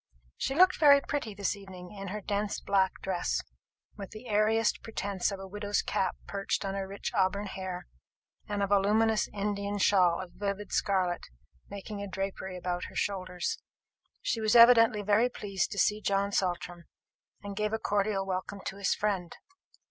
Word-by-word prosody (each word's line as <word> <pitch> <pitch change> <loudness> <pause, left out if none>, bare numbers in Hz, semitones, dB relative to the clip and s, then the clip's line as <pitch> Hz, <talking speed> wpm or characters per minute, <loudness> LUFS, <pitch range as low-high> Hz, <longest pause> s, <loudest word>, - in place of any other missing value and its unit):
She 270 - -2
looked 370 +3 +5
very 285 -3 +8
pretty 275 -7 -4
this 200 0 -1
evening, 185 -3 -11
in 195 -1 -7
her 210 +3 -4
dense 205 +1 -2
black 190 -1 +1
dress, 185 -2 -1 0.5
with 200 -2 -7
the 215 +3 -11
airiest 215 +1 +2
pretence 200 -4 -2
of 195 - -5
a 195 - -7
widow's 205 +1 -1
cap 190 - 0
perched 200 0 -2
on 195 - -2
her 195 -1 -3
rich 200 +1 -5
auburn 195 +2 +1
hair, 185 -2 -5 0.6
and 205 -1 -1
a - - +4
voluminous 210 +2 +3
Indian 200 0 -2
shawl 185 -4 +4
of 185 -2 -7
vivid 205 0 -4
scarlet 185 -3 0 0.4
making 200 +1 -6
a 200 - -4
drapery 190 -1 -4
about 180 0 -3
her - - -11
shoulders. 185 - -2 0.6
She 225 - -1
was 220 +2 +2
evidently 230 -3 +7
very 210 +4 +3
pleased 200 -5 -2
to - - -8
see 210 +3 +2
John 200 0 +1
Saltram, 175 -3 -2 0.6
and 200 -1 -6
gave 210 +1 -1
a 220 - 0
cordial 205 -2 0
welcome 195 +1 -4
to 195 - -4
his 200 -2 +1
friend. 195 -5 -2
200 Hz, 170 wpm, -30 LUFS, 190-210 Hz, 0.6 s, very